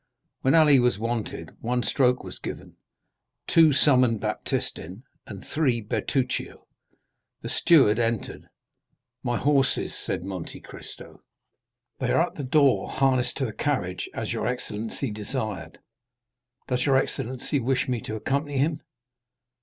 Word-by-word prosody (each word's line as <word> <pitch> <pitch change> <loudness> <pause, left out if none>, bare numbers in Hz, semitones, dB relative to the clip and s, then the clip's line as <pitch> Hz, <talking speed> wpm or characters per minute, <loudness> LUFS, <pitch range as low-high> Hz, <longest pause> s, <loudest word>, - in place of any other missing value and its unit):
When 135 +4 +3
Ali 150 -4 +6
was 120 -5 +2
wanted 115 0 -3
one 120 +1 0
stroke 125 -2 +2
was - - -8
given, - - -8 0.7
two 160 -2 +5
summoned 125 -5 +4
Baptistin, 95 +4 -3 0.2
and 100 -2 -9
three 135 -7 +1
Bertuccio. 125 +4 -2 0.8
The - - -4
steward 130 -10 +5
entered. 115 -2 -2 0.7
"My 120 -2 -1
horses," 140 -2 +1
said - - -2
Monte 95 -3 -6
Cristo. - - -11 0.8
"They - - 0
are - - +4
at - - -11
the 145 - -6
door 140 0 +3
harnessed 130 -2 +1
to 135 - 0
the 110 - -4
carriage 95 -12 -2
as - - -3
your - - -2
excellency 115 0 -3
desired. 105 -6 -4 0.9
Does 125 +2 0
your 135 -1 +5
excellency 130 +2 -1
wish 130 +1 0
me 125 -3 -1
to 110 - -5
accompany 140 +5 -2
him?" 150 +3 +1
125 Hz, 130 wpm, -26 LUFS, 110-140 Hz, 0.9 s, Ali